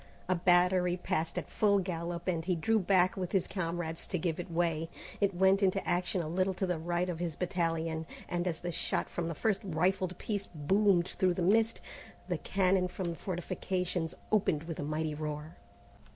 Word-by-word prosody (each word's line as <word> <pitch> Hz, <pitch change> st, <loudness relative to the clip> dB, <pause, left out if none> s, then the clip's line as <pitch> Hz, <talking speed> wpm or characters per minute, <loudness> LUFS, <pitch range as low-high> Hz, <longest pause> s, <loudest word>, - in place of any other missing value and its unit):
A 185 Hz, -, +3 dB
battery 180 Hz, 0 st, +4 dB
passed 175 Hz, -3 st, -2 dB
at -, -, -2 dB
full 205 Hz, -2 st, +3 dB
gallop, 175 Hz, -2 st, -3 dB
and 170 Hz, -3 st, 0 dB
he 180 Hz, +1 st, +1 dB
drew 220 Hz, +7 st, +2 dB
back 185 Hz, -1 st, +3 dB
with 185 Hz, -2 st, -4 dB
his 190 Hz, -3 st, +3 dB
comrades 170 Hz, -3 st, -3 dB
to 180 Hz, -, -1 dB
give 165 Hz, -1 st, -1 dB
it 175 Hz, -, -5 dB
way. 165 Hz, -1 st, 0 dB, 0.3 s
It 200 Hz, -2 st, +2 dB
went 190 Hz, +2 st, +4 dB
into 195 Hz, 0 st, +1 dB
action 175 Hz, 0 st, 0 dB
a -, -, -4 dB
little 185 Hz, +3 st, 0 dB
to 190 Hz, -, 0 dB
the 180 Hz, -3 st, -1 dB
right 175 Hz, +2 st, 0 dB
of 175 Hz, -3 st, -3 dB
his 170 Hz, -3 st, -2 dB
battalion, 165 Hz, -2 st, -1 dB, 0.2 s
and 175 Hz, 0 st, -1 dB
as 165 Hz, -3 st, -2 dB
the 175 Hz, -, -3 dB
shot -, -, -1 dB
from 170 Hz, -1 st, -2 dB
the 165 Hz, -, -3 dB
first 215 Hz, +5 st, +1 dB
rifled 185 Hz, +1 st, 0 dB
piece 205 Hz, -2 st, -3 dB
boomed 180 Hz, +3 st, +2 dB
through 185 Hz, -2 st, +1 dB
the 180 Hz, -, -1 dB
mist, 225 Hz, +5 st, +3 dB, 0.5 s
the -, -, -1 dB
cannon 185 Hz, -1 st, +2 dB
from 180 Hz, 0 st, -4 dB
the -, -, -5 dB
fortifications 180 Hz, 0 st, -2 dB, 0.2 s
opened 185 Hz, -8 st, +2 dB
with 165 Hz, -1 st, -6 dB
a -, -, -2 dB
mighty 155 Hz, +1 st, -1 dB
roar. 150 Hz, +1 st, -5 dB
175 Hz, 195 wpm, -32 LUFS, 165-190 Hz, 0.5 s, battery